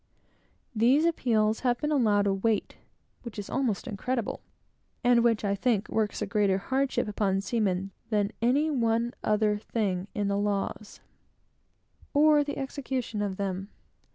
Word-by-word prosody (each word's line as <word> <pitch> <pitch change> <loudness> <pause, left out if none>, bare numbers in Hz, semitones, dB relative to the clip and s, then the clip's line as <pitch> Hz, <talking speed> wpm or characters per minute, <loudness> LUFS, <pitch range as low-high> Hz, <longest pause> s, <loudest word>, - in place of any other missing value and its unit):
These 255 +8 +4
appeals 225 -9 +1
have 245 -2 +1
been 300 0 -1
allowed 215 -8 +3
a 200 - +2
weight 210 +2 0 0.5
which 235 -3 -9
is 205 - -6
almost 250 -7 -1
incredible, 235 +3 -3 0.6
and 245 -1 +4
which, 230 -3 +2
I 200 - +1
think, 215 0 0
works 215 -1 -1
a - - -1
greater 205 -3 +2
hardship 265 +6 -1
upon 200 -2 0
seamen 195 -3 -1 0.2
than 210 -2 +1
any 280 +7 +2
one 235 -2 +1
other 210 -1 +2
thing 200 -4 -2
in 205 -1 0
the 200 0 0
laws, 205 +1 -3 1.1
or 300 0 +5
the 285 0 -5
execution 265 -5 -3
of 200 -2 -2
them. 195 0 -3
220 Hz, 145 wpm, -28 LUFS, 200-250 Hz, 1.1 s, or